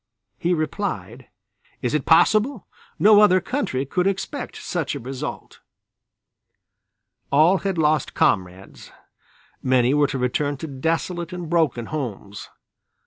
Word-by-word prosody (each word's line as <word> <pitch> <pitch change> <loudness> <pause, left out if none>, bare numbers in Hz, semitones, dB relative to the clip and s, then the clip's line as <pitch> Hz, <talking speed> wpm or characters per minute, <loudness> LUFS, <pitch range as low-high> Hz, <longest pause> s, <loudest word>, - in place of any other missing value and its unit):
He 175 +1 +1
replied: 170 +6 -4 0.6
"Is - - -1
it - - -1
possible! 220 +2 +3 0.3
No 210 0 +6
other 185 -3 +5
country 185 - -2
could 180 +7 0
expect 195 +8 -3
such 165 -5 -3
a - - -5
result." 130 +1 -7 1.7
All 160 +7 +4
had 195 -3 -2
lost 155 -2 +1
comrades, 95 0 -1 0.7
many 130 0 +2
were 145 -1 +3
to 135 - -4
return 140 +3 -1
to 160 - -6
desolate 165 +4 -2
and 175 -2 -6
broken 155 -9 +1
homes. 110 -9 -6
155 Hz, 120 wpm, -22 LUFS, 130-185 Hz, 1.7 s, No